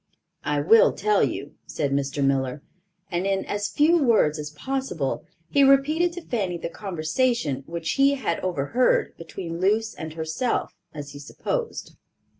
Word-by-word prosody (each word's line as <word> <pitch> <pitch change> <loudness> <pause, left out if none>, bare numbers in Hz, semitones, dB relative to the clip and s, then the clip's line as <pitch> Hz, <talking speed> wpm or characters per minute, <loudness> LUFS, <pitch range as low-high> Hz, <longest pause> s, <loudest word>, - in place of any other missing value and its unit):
"I 145 -1 0
will 220 +9 +6
tell 210 0 +2
you," 145 +2 -3
said 145 -2 -2
Mr. 140 0 0
Miller; 135 0 0 0.5
and, 175 +2 0
in 195 -1 0
as 205 0 -2
few 325 +3 +4
words 190 - +3
as 150 0 -4
possible 165 - -3 0.2
he 280 - +5
repeated 295 +6 +4
to 355 -1 -7
Fanny 195 -7 -1
the 170 - -5
conversation 170 - -1
which 165 -1 -3
he 275 +1 +4
had 265 - -2
overheard, 185 - +1
between 170 0 -7
Luce 215 +3 +2
and 160 -1 -7
herself, 160 +10 -2 0.2
as 145 -2 -8
he 145 - -10
supposed. 460 - -4
180 Hz, 150 wpm, -25 LUFS, -, 0.5 s, will